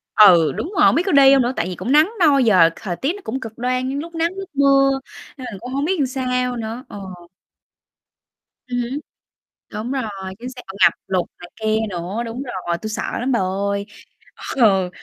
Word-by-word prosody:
Ừ, 180 -7 +7
đúng 360 - -5
rồi, - - +5
hông - - +5
biết 335 - +2
có 385 - 0
đi 275 -2 +7
hông 270 - +5
nữa? 245 +2 0
Tại - - -1
vì 185 - -5
cũng 190 +8 -4
nắng 305 +7 +5
nôi, 290 -6 +5
giờ 185 -8 +5
thời 185 -5 -5
tiết 275 - -1
nó 410 - -11
cũng 260 +5 -4
cực 225 -2 -9
đoan, 255 +1 -1
giống 275 - -3
lúc 335 +3 -8
nắng 330 +1 0
lúc 390 -1 -7
mưa, 275 -1 +3 0.4
nên 255 - -8
mình 200 - -8
cũng 250 +4 -8
không 280 +2 -1
biết 375 +3 0
làm 275 - +2
sao 250 -1 -1
nữa, 230 +2 -5
ờ. 205 - -8 1.7
Ừm 245 0 -2
hứm. 250 +4 -4 0.7
Đúng 215 +3 -5
rồi, 270 -1 -1 0.4
chính 245 +2 -7
xác, 255 -1 -10
ờ, 190 0 -9
ngập - - +7
lụt 185 -2 0
này 175 - -11
kia 220 0 +1
nữa, 180 +5 -4
đúng 235 +4 -5
rồi, 185 -9 -4
tui 215 +4 -6
sợ 215 - -3 0.2
lắm 260 +2 -1
bà 235 - +2
ơi. 200 +2 -2 0.7
Ừ, 195 -7 +4
245 Hz, 220 wpm, -20 LUFS, 200-275 Hz, 1.7 s, Ừ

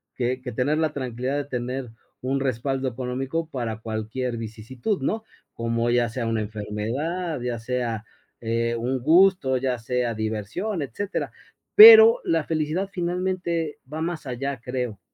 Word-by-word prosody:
que 125 +1 -1
que 125 - -6
tener 145 +6 +1
la 155 -2 +1
tranquilidad 130 +1 -3
de 145 - -2
tener 125 -2 -4 0.3
un 135 +2 -1
respaldo 135 +1 -1
económico 130 +6 -3
para 115 -5 -4
cualquier 115 +3 -3
vicisitud, 115 - -4
¿no?, 220 +11 -1 0.3
como 115 0 -1
ya 120 -1 +2
sea 115 0 -3
una 115 -1 0
enfermedad, 115 - -3
ya 120 -1 -2
sea, 115 -2 -3 0.4
eh, 115 +1 0
un 125 +3 -1
gusto, 165 -2 +4
ya 125 -1 -1
sea 120 0 -1
diversión, 110 - -3
etcétera, 190 - -4 0.4
pero 445 +2 +11
la 165 -1 +1
felicidad 160 +4 -1
finalmente 175 -3 -2
va 155 - -4
más 165 -1 -3
allá, 135 +1 -3
creo. 125 -5 -4
130 Hz, 145 wpm, -24 LUFS, 115-160 Hz, 0.4 s, pero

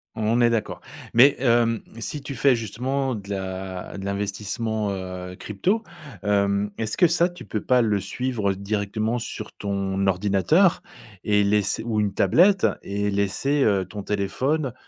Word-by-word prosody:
On 110 +2 +1
est 120 - +5
d'accord 115 -2 -2 0.3
mais 135 +4 +7
hem, 115 -3 +2 0.2
si 145 +5 -4
tu 140 -1 -6
fais 130 +1 +4
justement 130 +4 -2
de 100 -1 -9
la 95 -1 -5
de 95 - -6
l'investissement, 105 +2 -2
heu, 90 -1 -6
crypto, 180 - -1 0.4
hem, 100 0 +1
est-ce 110 -1 -2
que 175 - +6
ça 170 +2 +2
tu 175 - -12
peux 105 - -3
pas 125 -1 +3
le 105 -3 +1
suivre 105 0 -2
directement 105 +3 -2
sur 110 -2 -6
ton 100 -1 -2
ordinateur? 100 - +3 0.4
Et 105 -1 +3
laisser 105 0 +1
ou 110 -2 -1
une 105 -2 0
tablette? 175 - +4 0.2
Et 100 +1 -2
laisser, 100 +9 +1
heu, 100 -5 +2
ton 100 +3 -7
téléphone 125 +8 -1
105 Hz, 155 wpm, -24 LUFS, 100-125 Hz, 0.4 s, mais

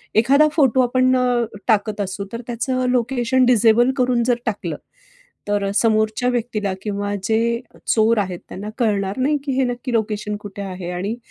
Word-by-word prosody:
एखादा 275 +7 +5
फोटो 270 -5 +3
आपण 255 +1 +2
अ, 250 - +2 0.4
टाकत 215 -2 +1
असू, 195 0 -4
तर 230 - -4
त्याचं 255 +2 -1
लोकेशन 250 +1 +1
डिसेबल 240 +1 +4
करून 250 -2 +2
जर 245 - +3
टाकलं, 200 -8 -3 0.7
तर 205 -1 0
अ, 195 - -1
समोरच्या 220 +2 +2
व्यक्तीला 220 -5 -2
किंवा 205 -1 -3
जे 230 +2 +1 0.3
चोर 225 0 +3
आहेत 185 -4 -2
त्यांना 205 +3 -7
कळणार 200 -3 0
नाही 285 +4 +2
की 280 - -2
हे 265 - +3
नक्की 245 +1 -3
लोकेशन 210 -2 -1
कुठे 200 0 -7
आहे? 185 -2 -6
आणि 190 +6 -3
225 Hz, 165 wpm, -20 LUFS, 205-250 Hz, 0.7 s, एखादा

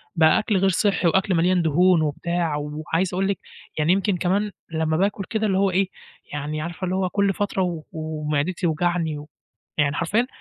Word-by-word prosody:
بقى 160 -1 +5
أكل 215 -2 0
غير 195 +1 +3
صحّي 190 0 +2
وأكل 190 +3 +2
مليان 180 +2 +3
دهون 170 +2 +4
وبتاع، 165 +1 -1
وعايز 155 +5 -2
أقول 190 +2 +1
لِك 200 -3 -1 0.4
يعني 155 +4 +3
يمكن 195 -1 +1
كمان 200 +4 0 0.2
لمّا 160 -1 0
باكُل 200 +2 0
كده 220 -1 0
اللي 190 -2 +1
هو 195 -1 +3
إيه، 190 +1 +1 0.4
يعني 150 +1 -3
عارفة 170 +3 -4
اللي 185 +1 -1
هو 185 -1 0
كُلّ 200 0 +1
فترة 205 -1 -1
و 170 -4 -3
ومعدتي 155 0 -2
توجعني 170 -2 0
و 150 +1 -9 0.5
يعني 145 0 +2
حرفيًا 210 +9 +1
175 Hz, 185 wpm, -23 LUFS, 155-190 Hz, 0.5 s, بقى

